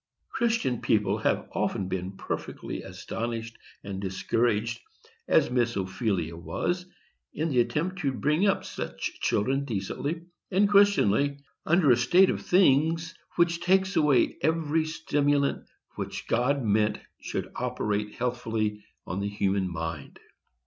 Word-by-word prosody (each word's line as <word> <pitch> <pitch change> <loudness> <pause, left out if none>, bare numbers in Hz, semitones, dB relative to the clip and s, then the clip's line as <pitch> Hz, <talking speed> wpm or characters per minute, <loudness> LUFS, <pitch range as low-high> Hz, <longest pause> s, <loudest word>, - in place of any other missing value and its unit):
Christian 225 - 0
people 105 -2 +1
have - - 0
often 95 - -1
been 95 +1 -4
perfectly - - -5
astonished 115 0 -5 0.3
and 100 -1 -5
discouraged, 115 +4 0 0.5
as - - +3
Miss 120 -1 +1
Ophelia 95 -3 -1
was, 175 - -3 0.5
in 160 +2 -1
the 130 -4 +2
attempt 170 +9 0
to 140 -6 0
bring 150 +9 +1
up 195 - +1
such - - -5
children 135 +7 +1
decently 140 - -3 0.3
and 200 +2 +3
Christianly, 145 - +4 0.3
under 170 -4 +5
a 120 - +5
state 175 +11 +5
of - - -3
things 165 -1 +3 0.2
which 170 0 +2
takes 190 +2 +2
away 150 -5 +3
every 160 +1 +1
stimulant 145 -3 0 0.3
which - - -5
God 130 +4 +1
meant 105 0 +2 0.2
should - - -4
operate 105 0 -2
healthfully 115 -4 -2 0.2
on 90 +2 -3
the 100 +1 -1
human 100 -2 0
mind. 80 -3 -5
125 Hz, 130 wpm, -27 LUFS, 105-160 Hz, 0.5 s, under